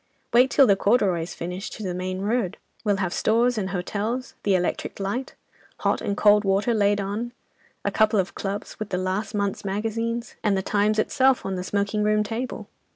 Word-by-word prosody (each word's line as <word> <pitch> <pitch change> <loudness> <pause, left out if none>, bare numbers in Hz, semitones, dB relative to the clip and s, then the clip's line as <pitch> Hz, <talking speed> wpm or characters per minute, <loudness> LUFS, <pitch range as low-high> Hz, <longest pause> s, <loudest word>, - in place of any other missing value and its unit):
Wait 250 +2 +6
till 275 0 +6
the 200 -5 +5
corduroy's 190 -6 +1
finished 180 +5 -5
to 215 - -7
the 185 -2 -2
main 185 +1 -3
road; 210 -2 0 0.3
we'll 205 -3 +2
have 185 -2 -1
stores 235 +3 +2
and 195 -3 -2
hotels, 210 +7 -3
the 200 -2 +2
electric 180 +2 -2
light, 205 +7 -3 0.5
hot - - +1
and 200 -1 -2
cold 210 0 +5
water 200 +4 +2
laid 205 -1 +2
on; 210 +5 -3 0.5
a - - +1
couple 215 -1 +3
of 185 - -1
clubs, 200 +1 -5
with 215 -1 -4
the 180 - -1
last 190 +4 -2
month's 200 -1 -1
magazines, 225 +4 -2
and 205 -2 +2
The 190 - -1
Times 210 +2 +1
itself 260 +4 +2
on 195 - -2
the 180 -1 -3
smoking 205 +2 -1
room 210 0 +3
table. 230 +4 -4
205 Hz, 190 wpm, -25 LUFS, 195-225 Hz, 0.5 s, Wait